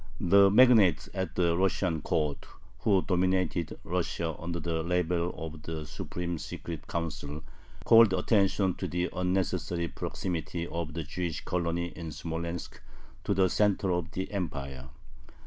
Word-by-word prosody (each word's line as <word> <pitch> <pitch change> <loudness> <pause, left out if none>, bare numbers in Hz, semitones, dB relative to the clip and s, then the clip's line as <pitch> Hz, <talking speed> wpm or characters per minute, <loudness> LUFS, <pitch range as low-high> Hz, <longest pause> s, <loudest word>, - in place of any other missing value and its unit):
The 100 +2 +6
magnates 110 -7 +5
at 95 -3 -3
the 85 -2 +2
Russian 90 -3 +1
court, 75 -1 -1 0.3
who 100 -4 +3
dominated 90 -3 0
Russia 85 -2 -2
under 85 +1 -4
the 80 0 -2
label 90 0 0
of 80 -1 -7
"The 80 0 -5
Supreme 85 +1 -4
Secret 85 -1 -7
Council," 80 -2 -4 0.4
called 115 -2 +7
attention 95 0 +2
to - - -3
the 90 +1 -1
unnecessary 90 -2 -1
proximity 85 -1 -4
of 85 -1 -4
the 85 - -2
Jewish 85 +1 -4
colony 85 0 -1
in 85 -2 -6
Smolensk 85 +2 -5 0.4
to - - +1
the 95 0 +4
center 100 0 +2
of 85 -1 -1
the 95 +1 -4
Empire. 70 -9 -4
85 Hz, 135 wpm, -29 LUFS, 80-95 Hz, 0.4 s, called